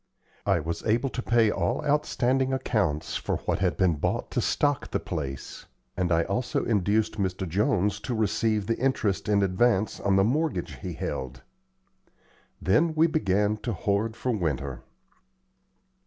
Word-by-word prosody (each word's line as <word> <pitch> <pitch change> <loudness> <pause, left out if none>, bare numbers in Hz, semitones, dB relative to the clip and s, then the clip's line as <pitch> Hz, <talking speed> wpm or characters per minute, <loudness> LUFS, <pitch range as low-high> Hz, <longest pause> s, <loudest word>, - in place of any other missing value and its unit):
I - - +3
was 85 +2 -4
able 120 +5 +1
to 125 - -3
pay 115 -3 +3
all 85 -2 -1
outstanding 135 -3 +1
accounts 95 - 0
for - - -2
what - - 0
had 90 -1 0
been 90 -5 +2
bought - - -2
to - - 0
stock 145 -2 0
the - - -1
place, 70 -3 -6 0.3
and 90 -1 0
I 85 0 +3
also 120 +7 -1
induced 105 +1 +1
Mr. 95 -1 -1
Jones 105 - +1
to 120 +2 -3
receive 110 -1 +1
the 115 +3 -1
interest 115 -7 0
in 100 -1 +3
advance 100 +2 +1
on 100 -1 +2
the 95 - +5
mortgage 150 +9 -1
he 90 -3 -6
held. 65 -4 -5 1.2
Then 155 - +2
we 160 +1 +5
began 105 - +1
to 115 +1 -3
hoard 105 +4 -1
for 125 - -2
winter. 70 - -2
105 Hz, 155 wpm, -27 LUFS, 90-120 Hz, 1.2 s, the